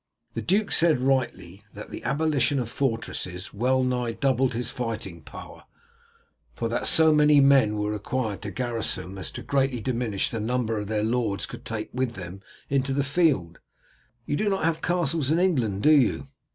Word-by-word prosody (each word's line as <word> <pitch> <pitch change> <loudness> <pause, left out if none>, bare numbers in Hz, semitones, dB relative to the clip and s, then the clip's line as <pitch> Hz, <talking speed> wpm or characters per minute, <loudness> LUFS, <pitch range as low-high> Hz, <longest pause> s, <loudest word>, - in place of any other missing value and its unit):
The - - -3
duke 200 +3 +1
said 165 -5 +4
rightly 125 -8 -1
that 105 - -9
the - - -7
abolition 145 -1 +1
of 120 -3 -2
fortresses 110 -8 -3
well 130 +5 +1
nigh 125 -2 -1
doubled 130 -1 +1
his 120 +1 -2
fighting 115 -9 -5
power, - - -11 0.9
for 115 - -2
that 115 - -1
so 160 -1 +6
many 150 -1 +5
men 135 -6 +5
were 105 0 -1
required 105 0 -3
to 105 - -5
garrison 115 -5 -2
them 95 - -9
as 95 - -3
to - - -8
greatly 135 -3 0
diminish 115 -4 -1
the 115 - -3
number 115 -1 -1
their 105 0 -2
lords 110 -3 0
could - - -10
take 110 -1 -4
with 125 -2 -2
them 95 0 -8 0.3
into 135 -1 0
the 140 +1 +1
field. 140 - +1 0.7
You - - -1
do 210 0 +1
not 195 -1 -1
have 165 0 0
castles 170 -5 0
in 160 - +3
England, 125 - +1
do 155 - +6
you?" 140 -3 +3
125 Hz, 180 wpm, -25 LUFS, 110-140 Hz, 0.9 s, so